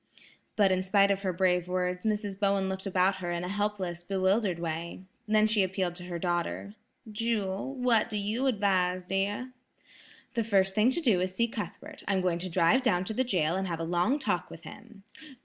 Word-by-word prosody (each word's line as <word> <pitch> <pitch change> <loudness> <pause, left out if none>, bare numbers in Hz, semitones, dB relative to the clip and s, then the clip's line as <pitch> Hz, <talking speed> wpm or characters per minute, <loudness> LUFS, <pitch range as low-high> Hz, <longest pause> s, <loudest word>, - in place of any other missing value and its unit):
But 200 -3 +4
in 185 0 +2
spite 200 +1 +3
of 195 0 0
her 190 -2 0
brave 180 -1 +1
words, 180 +1 -2
Mrs. 205 -2 -1
Bowen 200 -1 +2
looked 190 +1 -4
about 190 0 +2
her 180 -2 -4
in 175 0 -2
a - - -3
helpless, 195 -3 -2
bewildered 190 +1 +1
way. 170 +2 -5 0.2
Then 215 0 +4
she 215 -1 +2
appealed 185 -1 -1
to 180 - -9
her 175 -1 -4
daughter, 175 +3 -2 0.4
"Jewel, 215 +2 -2
what 245 -4 +2
do 215 - -2
you 215 +6 -1
advise, 185 -5 +1
dear?" 200 +7 -2 0.8
"The 230 - 0
first 195 -3 +2
thing 215 +4 +4
to 300 +6 0
do 220 - +3
is 185 - 0
to 185 - -15
see 235 +2 +2
Cuthbert; 220 -2 -7
I'm 195 -2 +1
going 175 -2 0
to 185 +1 -4
drive 170 +8 +3
down 185 -8 +1
to 220 - -3
the 260 - +1
jail 175 -10 +1
and 190 +1 -1
have 165 -2 -3
a - - -2
long 175 - +1
talk 275 - -2
with - - -11
him." 200 -4 -12
190 Hz, 205 wpm, -29 LUFS, 180-210 Hz, 0.8 s, But